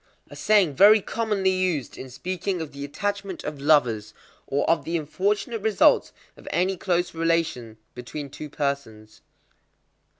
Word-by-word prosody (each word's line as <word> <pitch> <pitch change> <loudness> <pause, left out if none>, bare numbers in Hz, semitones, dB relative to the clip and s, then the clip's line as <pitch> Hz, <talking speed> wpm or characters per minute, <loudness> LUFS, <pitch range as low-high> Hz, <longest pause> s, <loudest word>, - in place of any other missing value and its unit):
A - - -9
saying 200 -8 +3
very 205 +9 +7
commonly 210 -2 -1
used 185 -8 -1
in 130 - -9
speaking 180 +7 -3
of 160 -3 -6
the 140 0 -8
attachment 200 +5 -4
of 150 -2 -6
lovers, 120 -8 +2 0.3
or 140 - 0
of 165 - +2
the 170 +1 -1
unfortunate 205 - -2
results 220 0 +3 0.2
of - - -17
any 185 +2 +1
close 175 -1 -1
relation 165 -9 -1 0.2
between 135 +3 -7
two 150 - -8
persons. 140 -8 -4
165 Hz, 140 wpm, -24 LUFS, 140-190 Hz, 0.3 s, very